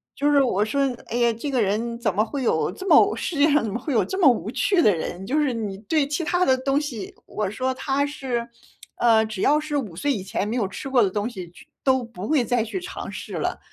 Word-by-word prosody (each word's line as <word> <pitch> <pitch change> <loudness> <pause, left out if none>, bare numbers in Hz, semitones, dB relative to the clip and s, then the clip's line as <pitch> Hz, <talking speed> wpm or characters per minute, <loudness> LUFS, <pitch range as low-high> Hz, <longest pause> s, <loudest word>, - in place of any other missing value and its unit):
就 290 +1 +1
是 285 - +5
我 210 -6 +2
说， 275 +6 0 0.2
哎 235 - -3
呀， 235 -1 +3
这 255 +6 -5
个 255 -3 +2
人 225 +3 -1
怎 215 -6 -1
么 210 - +3
会 260 +4 -4
有 160 -6 +1
这 375 - -8
么 - - +6
世 350 - -3
界 290 +1 +4
上 295 0 +4
怎 215 -3 -3
么 - - -1
会 265 +5 -5
有 240 - +2
这 380 - -4
么 375 - +3
无 230 -3 0
趣 360 +6 +2
的 205 - +4
人， 175 +3 -5
就 275 +9 -1
是 290 -4 +2
你 210 -4 -4
对 285 +6 0
其 295 +4 -2
它 355 +3 +1
的 260 -1 +3
东 275 +2 +1
西， 245 -10 -6
我 205 -3 -3
说 260 +4 -1
他 275 +2 0
是， 260 -5 -3 0.5
呃， 225 -2 +4
只 215 -3 -6
要 300 +2 +4
是 305 -1 -4
5 215 - -3
岁 285 +9 +1
以 200 - -4
前 195 +1 -2
没 220 - -2
有 235 -5 +1
吃 195 +8 -6
过 255 -3 +4
的 195 - +2
东 205 +3 -2
西 185 -7 -8
去 - - -17 0.2
都 260 -1 +3
不 220 -5 -8
会 290 -6 +3
再 245 -2 +1
去 235 - -4
尝 360 - -7
试 - - -8
了， - - -2
245 Hz, 280 characters per minute, -23 LUFS, 215-285 Hz, 0.5 s, 么